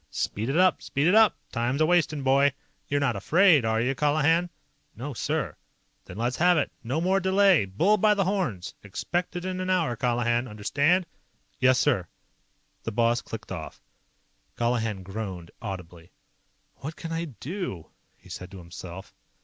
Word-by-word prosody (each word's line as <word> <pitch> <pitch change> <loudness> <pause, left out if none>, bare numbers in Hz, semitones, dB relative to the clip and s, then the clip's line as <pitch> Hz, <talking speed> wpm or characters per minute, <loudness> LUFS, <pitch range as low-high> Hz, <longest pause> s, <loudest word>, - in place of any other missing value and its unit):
"Speed 110 +5 -2
it 140 - 0
up. 185 0 +4
Speed 140 +1 -1
it 180 - +4
up! 220 -2 +6
Time's 120 +4 -1
a'wastin', 155 -3 +2
boy. 135 +1 +4 0.3
You're 145 - +1
not 135 -5 +1
afraid, 160 - +4
are 110 0 +1
you, 125 +4 +1
Colihan?" 155 +5 +2 0.5
"No, 135 +6 -5
sir." - - -2 0.5
"Then 90 - -10
let's 120 +2 -1
have 175 +1 +4
it. 145 - 0
No 130 +7 -1
more 190 +3 +2
delay! 190 - +4
Bull 170 - +2
by 210 +1 +4
the 200 - +2
horns! 175 - -2
Expect 175 - -3
it 175 0 -4
in 185 0 -3
an 185 0 -3
hour, 170 -9 +1
Colihan. 120 +1 0
Understand?" 145 - +1 0.5
"Yes, 130 0 +4
sir!" 125 - +1 0.7
The 115 - -4
boss 115 +2 +2
clicked 110 -2 -8
off. 80 -4 -6 0.8
Colihan 115 -5 -1
groaned 95 -3 -6
audibly. 90 -5 -7 0.7
"What 155 +3 -7
can 165 - -7
I 165 +1 -2
do?" 140 - -6 0.3
he - - -20
said 90 - -8
to 95 - -11
himself. 90 +1 -10
135 Hz, 160 wpm, -26 LUFS, 110-175 Hz, 0.8 s, up